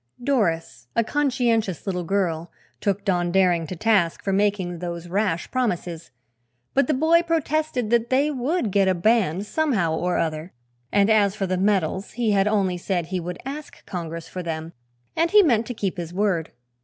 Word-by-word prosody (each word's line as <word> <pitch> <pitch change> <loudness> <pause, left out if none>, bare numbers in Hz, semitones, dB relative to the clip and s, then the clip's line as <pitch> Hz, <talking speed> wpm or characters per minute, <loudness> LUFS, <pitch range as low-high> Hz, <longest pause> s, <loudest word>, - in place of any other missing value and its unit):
Doris, 165 - 0
a 230 - +3
conscientious 235 - 0
little 180 -3 -2
girl, 170 -3 -1 0.3
took 200 0 -1
Don 175 -3 +1
Daring 175 -3 +3
to 185 - -5
task 195 -4 +1
for 195 - 0
making 195 -3 0
those 170 0 -5
rash 185 -2 -1
promises, 175 -9 -2 0.6
but 275 -2 +3
the 305 - +2
boy 320 +5 +4
protested 310 -7 -1
that 235 0 +2
they 280 +3 +2
would 265 - -1
get 195 0 +3
a 185 - +3
band, 195 -1 +2
somehow 215 - 0
or 180 +2 0
other, 160 +2 -2 0.4
and 200 -1 +4
as 210 -3 +3
for 200 - -1
the 185 0 -1
medals 190 -1 0
he 230 -2 0
had 195 0 +3
only 195 -4 +1
said 175 -1 -2
he 185 +2 -3
would 180 +1 -5
ask 290 +2 -8
"Congress" 165 -2 -5
for 185 - -6
them 165 -1 -5 0.4
and 330 +1 +2
he 415 +2 +7
meant 230 - +2
to 245 - -3
keep 195 -2 -2
his 170 -1 -5
word. 185 -5 0
195 Hz, 180 wpm, -23 LUFS, 175-235 Hz, 0.6 s, he